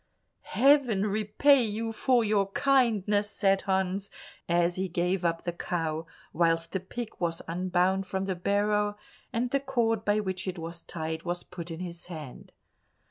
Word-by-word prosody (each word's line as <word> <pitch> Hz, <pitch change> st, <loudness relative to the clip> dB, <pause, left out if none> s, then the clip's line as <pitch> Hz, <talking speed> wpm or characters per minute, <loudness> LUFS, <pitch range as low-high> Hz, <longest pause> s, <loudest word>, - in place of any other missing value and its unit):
"Heaven 260 Hz, -7 st, +5 dB
repay 215 Hz, +7 st, +3 dB
you 225 Hz, +1 st, -2 dB
for 240 Hz, +2 st, +2 dB
your 205 Hz, -2 st, +2 dB
kindness!" 215 Hz, -7 st, +2 dB
said 195 Hz, -2 st, +2 dB
Hans 190 Hz, +1 st, -1 dB, 0.4 s
as 175 Hz, 0 st, +2 dB
he 190 Hz, +1 st, -1 dB
gave 180 Hz, +2 st, 0 dB
up 165 Hz, -1 st, 0 dB
the 175 Hz, -, -2 dB
cow, 165 Hz, -2 st, -3 dB, 0.3 s
whilst 165 Hz, 0 st, +2 dB
the 190 Hz, -, -1 dB
pig 220 Hz, +5 st, -6 dB
was 170 Hz, -1 st, -2 dB
unbound 185 Hz, +2 st, +1 dB
from 190 Hz, 0 st, -2 dB
the 190 Hz, -, -1 dB
barrow, 205 Hz, +3 st, +1 dB, 0.3 s
and 240 Hz, +2 st, -1 dB
the 275 Hz, -, +2 dB
cord 235 Hz, -5 st, 0 dB
by 205 Hz, 0 st, +2 dB
which 190 Hz, -2 st, -3 dB
it 185 Hz, -1 st, -3 dB
was 170 Hz, +1 st, -6 dB
tied 160 Hz, -1 st, -4 dB
was 175 Hz, +1 st, -3 dB
put 175 Hz, -1 st, -8 dB
in 165 Hz, +1 st, -6 dB
his 175 Hz, -1 st, -7 dB
hand. 155 Hz, -7 st, -9 dB
190 Hz, 160 wpm, -28 LUFS, 175-215 Hz, 0.4 s, Heaven